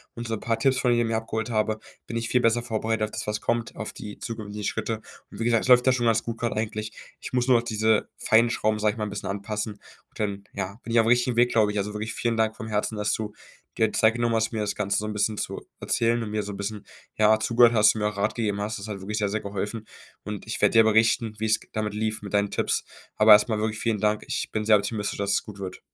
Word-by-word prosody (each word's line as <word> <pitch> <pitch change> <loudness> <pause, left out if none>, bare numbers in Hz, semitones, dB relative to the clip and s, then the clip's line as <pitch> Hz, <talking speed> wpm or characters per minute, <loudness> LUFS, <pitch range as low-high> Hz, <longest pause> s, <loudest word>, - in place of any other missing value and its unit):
und 120 0 -5
so 115 - -3
'n 110 - -2
paar 115 -1 -1
Tipps 135 -2 +2
von 125 - +2
dir, 120 0 +2
mir 115 0 0
abgeholt 110 +1 -3
habe, 110 0 0 0.3
bin 115 - -3
ich 115 0 -2
viel 125 - +2
besser 120 0 +2
vorbereitet 110 -1 -1
auf 105 - -2
das, - - -5
was 105 0 -1
kommt, 115 0 -2
auf 110 - -6
die 105 -1 -8
zukünftigen 105 -2 -6
Schritte. 110 -1 -2 0.3
Und - - -12
wie - - -1
gesagt, 115 -1 +3
das - - -3
läuft 125 0 +7
ja 130 - +5
schon 120 -2 +1
ganz 110 -1 +2
gut 115 -1 -5
grad 120 - -1
eigentlich. 110 0 -3 0.3
Ich - - -8
muss 125 0 +1
nur 125 -2 +6
auf 115 - -1
diese 110 -1 +1
feinen 115 +2 +4
Schrauben, 110 -2 0
sage 105 0 +2
ich - - -12
mal, 110 - -2
'n 105 - -5
bisschen 100 0 -5
anpassen. 105 +2 -3
Und 100 - -20
dann, 100 -2 -2
ja, 100 +4 -5
bin 115 - -6
ich 115 - +4
aufm 115 - +3
richtigen 120 +1 +3
Weg, 120 0 +4
glaube 110 -3 +3
ich. 105 - -4
Also 105 +1 -2
wirklich 110 +2 -4
vielen 120 -1 0
Dank 110 0 +1
vom 110 - -7
Herzen, 105 0 -1
dass 105 0 0
du 105 -1 -3 0.4
dir 110 -1 +2
Zeit 110 +1 +3
genommen 120 -1 +1
hast, 115 0 +1
mir 110 - -3
das 105 -1 -1
Ganze 100 -1 0
so 105 - -1
'n 110 - -3
bisschen 105 +1 0
zu - - -4 0.2
erzählen 115 0 +1
und 110 -2 -4
mir 105 0 0
so 105 - -6
'n 100 - -7
bisschen, 100 0 -5 0.3
ja, 110 0 +5
zugehört 120 +1 +5
hast 110 -1 +5
und - - -3
mir 105 - +2
auch 105 - -10
Rat 105 +2 0
gegeben 105 -4 -1
hast. 105 +2 -3
Das 100 - -7
hat 105 -2 -5
wirklich 105 +3 -3
sehr, 105 -1 0
sehr 110 +2 -1
geholfen. 105 +2 -4 0.4
Und 105 0 -6
ich 110 - -4
werde - - +4
dir 115 -1 +7
berichten, 110 +1 +2
wie 110 - -2
es 110 0 +2
g - - -19
damit 105 -1 -2
lief 110 +1 -2
mit 100 0 -8
deinen 100 0 +2
Tipps. - - 0 0.3
Aber 110 0 +6
erstmal 105 +1 +6
wirklich 110 0 -2
vielen 115 -3 0
Dank. 105 0 +1
Ich - - -2
bin 110 -1 -2
sehr 110 0 +6
optimistisch, 105 0 -2
dass 100 0 0
es - - +1
gut 105 -2 -11
wird. 95 -1 -6
110 Hz, 285 wpm, -25 LUFS, 105-115 Hz, 0.4 s, läuft